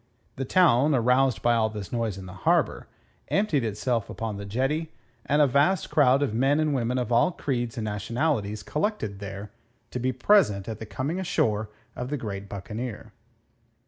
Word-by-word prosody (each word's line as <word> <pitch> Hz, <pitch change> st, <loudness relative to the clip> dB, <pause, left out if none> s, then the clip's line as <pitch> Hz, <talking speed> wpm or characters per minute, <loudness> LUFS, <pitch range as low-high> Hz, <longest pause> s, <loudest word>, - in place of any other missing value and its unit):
The 135 Hz, -, -3 dB
town, 145 Hz, -3 st, +4 dB
aroused 125 Hz, -2 st, +2 dB
by 120 Hz, -, +4 dB
all 110 Hz, -1 st, +2 dB
this 105 Hz, -3 st, -7 dB
noise 115 Hz, -5 st, -1 dB
in 95 Hz, -, -8 dB
the 90 Hz, -, -9 dB
harbour, 95 Hz, -, +1 dB, 0.4 s
emptied 195 Hz, -, +1 dB
itself 115 Hz, +1 st, -1 dB
upon 110 Hz, -2 st, -4 dB
the 100 Hz, 0 st, -7 dB
jetty, 140 Hz, +9 st, -1 dB, 0.4 s
and 150 Hz, +1 st, +4 dB
a -, -, +6 dB
vast 145 Hz, +8 st, +2 dB
crowd 140 Hz, -1 st, +4 dB
of 130 Hz, -, -1 dB
men 135 Hz, +6 st, +2 dB
and 155 Hz, -1 st, +1 dB
women 125 Hz, -1 st, 0 dB
of 125 Hz, -2 st, -2 dB
all 120 Hz, +9 st, +4 dB
creeds 120 Hz, -8 st, -3 dB
and 110 Hz, -, -2 dB
nationalities 105 Hz, -, -1 dB
collected 150 Hz, -, -2 dB
there 100 Hz, +1 st, -7 dB, 0.4 s
to 125 Hz, -, -3 dB
be 130 Hz, +1 st, 0 dB
present 125 Hz, -, +3 dB
at 110 Hz, -2 st, -5 dB
the 110 Hz, -, -7 dB
coming 145 Hz, -, -3 dB
ashore 110 Hz, -, 0 dB, 0.3 s
of 125 Hz, +1 st, -5 dB
the 145 Hz, -, -1 dB
great 100 Hz, -5 st, -6 dB
buccaneer. 105 Hz, +3 st, -6 dB
120 Hz, 175 wpm, -26 LUFS, 105-140 Hz, 0.4 s, a